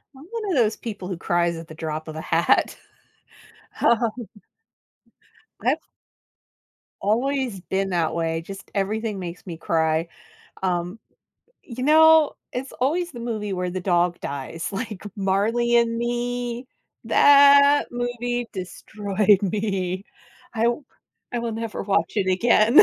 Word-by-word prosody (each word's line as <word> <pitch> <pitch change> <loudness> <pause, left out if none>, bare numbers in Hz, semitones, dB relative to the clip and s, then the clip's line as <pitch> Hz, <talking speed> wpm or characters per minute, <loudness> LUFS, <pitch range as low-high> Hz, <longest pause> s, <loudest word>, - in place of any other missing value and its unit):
I'm 270 +3 -13
one 460 -1 -4
of - - +1
those 220 -3 +3
people 205 -5 -7
who 185 -2 -4
cries 170 0 0
at 165 0 -9
the 160 - -11
drop 155 0 -5
of 155 - -7
a 160 - -5
hat. 165 +1 +2 1.0
Uh 235 - +5 1.7
I've - - +2 1.2
always 245 0 0
been 195 +2 -2
that 170 -3 0
way. 165 -1 -1
Just 195 +3 -10
everything 210 +1 -2
makes 175 -1 -7
me 170 -4 -7
cry. 160 0 0 0.5
Um, 180 +2 -2 0.6
you 250 0 -7
know, 315 +1 +6 0.2
it's 260 +2 -5
always 335 +6 0
the 240 - -8
movie 215 -4 -3
where 180 -1 -2
the 185 +1 -4
dog 175 -1 +1
dies. 140 +4 -5
Like, 210 -1 -5
Marley 215 +5 +1
and 230 -1 +2
Me, 240 +1 -2 0.4
that 285 0 +6
movie 245 0 -3
destroyed 200 +2 0
me. 195 -2 -2 0.5
I 225 0 +1
w 240 +5 0 0.5
I 240 - -1
will 235 -1 -3
never 225 0 -4
watch 195 -5 0
it 190 -2 +1
again. 225 - +5
210 Hz, 135 wpm, -23 LUFS, 180-240 Hz, 1.7 s, know